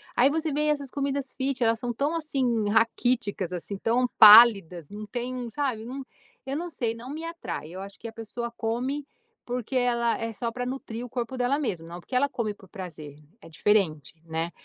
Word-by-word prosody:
Aí, 250 Hz, +3 st, +5 dB
você 315 Hz, +1 st, -1 dB
vê 300 Hz, +2 st, 0 dB
essas 285 Hz, -3 st, -1 dB
comidas 275 Hz, -1 st, -2 dB
fit 265 Hz, -2 st, -1 dB
elas 225 Hz, 0 st, +2 dB
são 240 Hz, +1 st, -3 dB
tão, 285 Hz, +7 st, 0 dB
assim, 255 Hz, -9 st, 0 dB
raquíticas, 220 Hz, -4 st, +1 dB
assim, 190 Hz, +3 st, -5 dB
tão 240 Hz, +5 st, +2 dB
pálidas. 200 Hz, -7 st, +8 dB
Não 210 Hz, +1 st, -7 dB
tem 245 Hz, +4 st, -4 dB
um 245 Hz, -2 st, -4 dB
sabe 235 Hz, -3 st, -2 dB
um 270 Hz, +2 st, -5 dB, 0.4 s
eu 270 Hz, +1 st, -3 dB
não 350 Hz, +2 st, -4 dB
sei, 240 Hz, -7 st, -2 dB
não 240 Hz, +3 st, -9 dB
me 315 Hz, +3 st, -6 dB
atrai. 335 Hz, -, -6 dB
Eu 190 Hz, -, -6 dB
acho 200 Hz, 0 st, -10 dB
que 230 Hz, -, -7 dB
a -, -, -7 dB
pessoa 235 Hz, +1 st, -5 dB
come, 250 Hz, +5 st, -2 dB, 0.4 s
porque 250 Hz, +1 st, -4 dB
ela 235 Hz, -2 st, +2 dB
é 230 Hz, 0 st, -3 dB
só 230 Hz, +2 st, -2 dB
pra 245 Hz, +1 st, -4 dB
nutrir 245 Hz, -2 st, -5 dB
o -, -, -10 dB
corpo 245 Hz, +1 st, -4 dB
dela 255 Hz, +4 st, +1 dB
mesmo. 180 Hz, -, -3 dB
Não 175 Hz, +1 st, -8 dB
porque 250 Hz, -, -7 dB
ela 280 Hz, +3 st, +3 dB
come 225 Hz, -6 st, -2 dB
por 195 Hz, -2 st, -18 dB
prazer, 160 Hz, -7 st, -8 dB, 0.2 s
é -, -, -13 dB
diferente, 160 Hz, -4 st, +1 dB
né. 165 Hz, +1 st, -3 dB
235 Hz, 205 wpm, -27 LUFS, 210-265 Hz, 0.4 s, pálidas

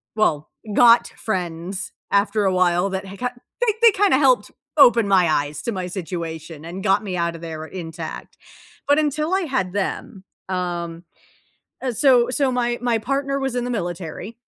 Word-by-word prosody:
Well, 155 Hz, -9 st, +1 dB, 0.2 s
got 235 Hz, +2 st, +6 dB
friends 180 Hz, -2 st, -4 dB, 0.2 s
after 200 Hz, +1 st, +2 dB
a 190 Hz, -, +2 dB
while 180 Hz, +1 st, +2 dB
that 190 Hz, +1 st, -4 dB
had 195 Hz, +1 st, -10 dB
ki 250 Hz, -, 0 dB, 0.3 s
they 470 Hz, -3 st, +3 dB
they 465 Hz, -1 st, +8 dB
kinda 390 Hz, -7 st, +3 dB
helped 255 Hz, -6 st, +3 dB, 0.3 s
open 235 Hz, -6 st, +6 dB
my 185 Hz, -3 st, +5 dB
eyes 145 Hz, -1 st, -1 dB
to 235 Hz, -, -2 dB
my 185 Hz, -2 st, -3 dB
situation 165 Hz, -4 st, -6 dB
and 175 Hz, +3 st, -7 dB
got 195 Hz, +1 st, +2 dB
me 185 Hz, -3 st, -3 dB
out 170 Hz, -1 st, -1 dB
of 165 Hz, -, -10 dB
there 160 Hz, -1 st, -6 dB
intact. 165 Hz, -1 st, -8 dB, 0.5 s
But 285 Hz, +1 st, +4 dB
until 305 Hz, +3 st, 0 dB
I 385 Hz, -, +2 dB
had 260 Hz, -, -2 dB
them, 195 Hz, -1 st, -3 dB, 0.2 s
um, 175 Hz, -2 st, -3 dB, 0.8 s
uh, 255 Hz, -2 st, -2 dB
so 245 Hz, 0 st, +4 dB
so 265 Hz, +1 st, +1 dB
my 240 Hz, -1 st, 0 dB
my 240 Hz, -2 st, +1 dB
partner 275 Hz, +4 st, -1 dB
was 270 Hz, -2 st, -2 dB
in 245 Hz, -, -1 dB
the 245 Hz, -, -3 dB
military 175 Hz, +1 st, -5 dB
195 Hz, 175 wpm, -22 LUFS, 175-250 Hz, 0.8 s, they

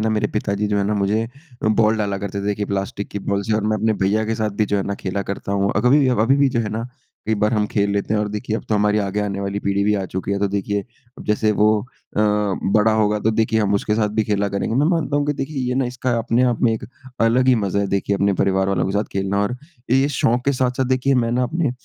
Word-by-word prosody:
ना 110 Hz, -, +1 dB
मेरे 105 Hz, -1 st, +1 dB
पिताजी 105 Hz, 0 st, -1 dB
जो 105 Hz, -, 0 dB
है 100 Hz, -, +1 dB
ना 105 Hz, -, 0 dB
मुझे 105 Hz, +3 st, 0 dB, 0.5 s
बॉल 110 Hz, 0 st, +3 dB
डाला 100 Hz, -2 st, -1 dB
करते 100 Hz, 0 st, -4 dB
थे -, -, -6 dB
देखिए 105 Hz, 0 st, -1 dB
प्लास्टिक 100 Hz, 0 st, -3 dB
की 100 Hz, -, -4 dB
बॉल 100 Hz, 0 st, +1 dB
से -, -, +2 dB
और 110 Hz, -, 0 dB
मैं 110 Hz, 0 st, +1 dB
अपने 110 Hz, 0 st, +1 dB
भैया 110 Hz, +3 st, +2 dB
के 115 Hz, -, -1 dB
साथ 110 Hz, -1 st, -1 dB
भी -, -, +5 dB
जो 105 Hz, -, 0 dB
है 100 Hz, -, 0 dB
ना 100 Hz, -, -2 dB
खेला 100 Hz, +1 st, -2 dB
करता 100 Hz, -, -5 dB
हूँ। 100 Hz, 0 st, +1 dB
अभी 125 Hz, +4 st, +4 dB
भी 135 Hz, -, +3 dB
अभी 130 Hz, +5 st, +4 dB
भी 140 Hz, -1 st, +4 dB
जो 120 Hz, -2 st, 0 dB
है 110 Hz, -, -2 dB
ना 115 Hz, +3 st, -4 dB, 0.4 s
कई 110 Hz, -, +2 dB
बार 105 Hz, +2 st, +2 dB
हम 105 Hz, -1 st, +1 dB
खेल 100 Hz, -1 st, 0 dB
लेते 100 Hz, +1 st, -1 dB
हैं। 105 Hz, -, +1 dB
और 105 Hz, -, -1 dB
देखिए 105 Hz, +2 st, -3 dB
अब -, -, -7 dB
तो 110 Hz, -, +1 dB
हमारी 105 Hz, +1 st, +2 dB
आगे 100 Hz, 0 st, -1 dB
आने 100 Hz, -1 st, -2 dB
वाली 100 Hz, 0 st, -2 dB
पीढ़ी 100 Hz, 0 st, 0 dB
भी 105 Hz, +1 st, +2 dB
आ 100 Hz, -2 st, -1 dB
चुकी 95 Hz, +2 st, -3 dB
है 100 Hz, -, 0 dB
तो 100 Hz, 0 st, +1 dB
देखिए 100 Hz, +1 st, -1 dB, 0.4 s
अब -, -, -10 dB
जैसे 105 Hz, 0 st, +2 dB
वो 105 Hz, -, +6 dB, 0.5 s
अ, -, -, +3 dB
बड़ा 105 Hz, +1 st, +2 dB
होगा 105 Hz, -1 st, +2 dB
तो 110 Hz, +2 st, +1 dB
देखिए 110 Hz, 0 st, +2 dB
हम 100 Hz, -1 st, +1 dB
उसके 105 Hz, +1 st, 0 dB
साथ 105 Hz, -1 st, +1 dB
भी 110 Hz, -, +3 dB
खेला 100 Hz, -1 st, 0 dB
करेंगे। 100 Hz, +3 st, -2 dB
मैं 145 Hz, +4 st, +3 dB
मानता 165 Hz, -5 st, +1 dB
हूँ 145 Hz, -, +1 dB
कि 145 Hz, -, +1 dB
देखिए 140 Hz, +2 st, -5 dB
ये 125 Hz, -, 0 dB
ना 135 Hz, -, +1 dB
इसका 125 Hz, +1 st, -3 dB
अपने 115 Hz, +2 st, +1 dB
आप 120 Hz, -, -3 dB
में 120 Hz, -, +4 dB
एक 110 Hz, -, -4 dB, 0.4 s
अलग 115 Hz, +3 st, +3 dB
ही 130 Hz, -, +6 dB
मज़ा 100 Hz, -2 st, 0 dB
है 100 Hz, -, 0 dB
देखिए 100 Hz, +1 st, 0 dB
अपने 100 Hz, +1 st, +2 dB
परिवार 95 Hz, 0 st, +2 dB
वालों 100 Hz, -, +1 dB
के 95 Hz, -, -2 dB
साथ 105 Hz, +1 st, +1 dB
खेलना। 95 Hz, +1 st, 0 dB
और 125 Hz, +5 st, -2 dB, 0.3 s
ये 135 Hz, +2 st, +4 dB
शौक़ 120 Hz, -3 st, +1 dB
के 140 Hz, -, +2 dB
साथ-साथ 130 Hz, 0 st, 0 dB
देखिए 130 Hz, +2 st, +2 dB
मैं 115 Hz, -, -1 dB
ना 125 Hz, +1 st, +1 dB
अपने 155 Hz, +2 st, 0 dB
105 Hz, 285 wpm, -21 LUFS, 100-115 Hz, 0.5 s, वो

